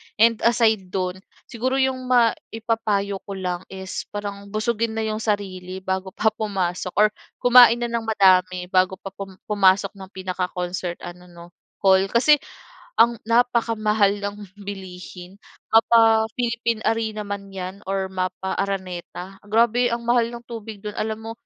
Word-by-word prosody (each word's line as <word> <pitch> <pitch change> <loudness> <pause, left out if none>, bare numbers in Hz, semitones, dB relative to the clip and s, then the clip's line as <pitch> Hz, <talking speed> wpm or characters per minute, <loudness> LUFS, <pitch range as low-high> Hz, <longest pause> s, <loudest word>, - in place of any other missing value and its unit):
And 230 +1 +4
aside 220 -5 +2
do'n, 185 0 -3 0.2
siguro 255 +3 -2
'yong 265 -1 0
maipapayo 225 -4 0
ko 200 - -5
lang 180 -1 -4
is 190 0 -6
parang 200 -1 -6
busugin 220 +2 -1
na 225 - -1
'yong 215 0 -2
sarili 190 -3 -3
bago 190 0 -3
pa 220 0 +2
pumasok 190 -4 -3
or 215 +1 +6 0.3
kumain 245 -1 +7
na 235 - -2
nang 230 -1 -2
madami 185 -3 +4
bago 185 0 +3
pa 195 +1 -9
pum 195 -1 -9
pumasok 200 -1 +3
ng 195 -2 -11
pinaka-concert 180 -1 -3
ano 180 +1 -9
'no, 170 -1 -13 0.4
hall. 190 0 +5
Kasi 285 +8 +4 0.6
ang 235 0 +4
napakamahal 220 -3 +2
ng 205 0 -3 0.3
bilihin 185 -1 -9 0.3
mapa-Philippine 225 0 +3
Arena 220 -2 -1
man 200 -1 -5
'yan 190 0 -6
or 195 -1 0
mapa-Araneta. 190 0 -4
Grabe 235 +2 +3
ang 235 0 -3
mahal 240 -1 +3
ng 235 0 -9
tubig 225 -2 -8
do'n, 210 -1 -5
alam 220 0 -3
mo, 225 - -6
205 Hz, 140 wpm, -23 LUFS, 190-225 Hz, 0.6 s, kumain